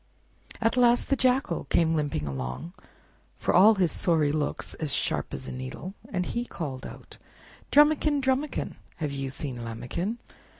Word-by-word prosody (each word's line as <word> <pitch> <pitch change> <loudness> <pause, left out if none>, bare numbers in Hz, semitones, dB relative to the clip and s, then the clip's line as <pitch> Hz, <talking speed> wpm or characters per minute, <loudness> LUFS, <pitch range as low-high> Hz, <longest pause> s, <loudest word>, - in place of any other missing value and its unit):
At 230 +2 +1
last 245 -1 +4
the 275 - +4
Jackal 255 -8 +1
came 165 -1 +2
limping 145 - -1
along, 65 - -5 0.6
for - - 0
all 210 +5 +7
his 185 -4 +2
sorry 155 -4 +2
looks 150 -1 -2
as 155 -3 -4
sharp - - -1
as 65 - -6
a - - -5
needle, 130 +9 -6 0.2
and 180 -2 -1
he 235 +5 -2
too - - -15
called 135 -5 -5
out— - - -12 0.5
"Drumikin! 295 0 +5
Drumikin! 265 +2 -1 0.2
Have 150 -3 -3
you 135 -1 -3
seen 130 -1 -3
Lambikin?" 125 - -3
170 Hz, 160 wpm, -27 LUFS, -, 0.6 s, all